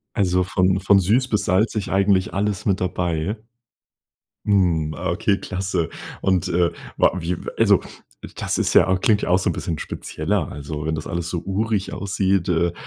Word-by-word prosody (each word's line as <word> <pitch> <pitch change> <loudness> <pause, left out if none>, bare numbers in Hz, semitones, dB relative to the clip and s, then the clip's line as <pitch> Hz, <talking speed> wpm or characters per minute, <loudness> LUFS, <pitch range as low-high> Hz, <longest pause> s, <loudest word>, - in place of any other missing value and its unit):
Also, 90 -3 +2
von 90 +1 +1
von 100 +1 +4
süß 115 +8 +2
bis 105 -4 0
salzig 105 +2 +1
eigentlich 95 -1 +2
alles 100 0 -1
mit 95 -3 +1
dabei. 90 +2 -1 1.1
Hm. 85 -6 +2
Okay, 100 +7 0
klasse. 95 -3 -2 0.3
Und, 95 -3 +1
äh, 85 0 +2 0.3
war 95 - +2
wie 85 +1 -2 0.2
also, - - +5 0.6
das - - -2
ist - - 0
ja 95 - +5
klingt 105 +2 +2
auch 90 +1 +3
so - - 0
'n - - -1
bisschen 80 -3 -4
spezieller. - - -3
Also, 75 +1 -6
wenn 80 - 0
das 75 -1 -5
alles 85 0 -3
so 85 -1 -2
urig 100 +1 -1
aussieht, 95 -2 0
äh, 85 0 +1
95 Hz, 165 wpm, -22 LUFS, 85-100 Hz, 1.1 s, also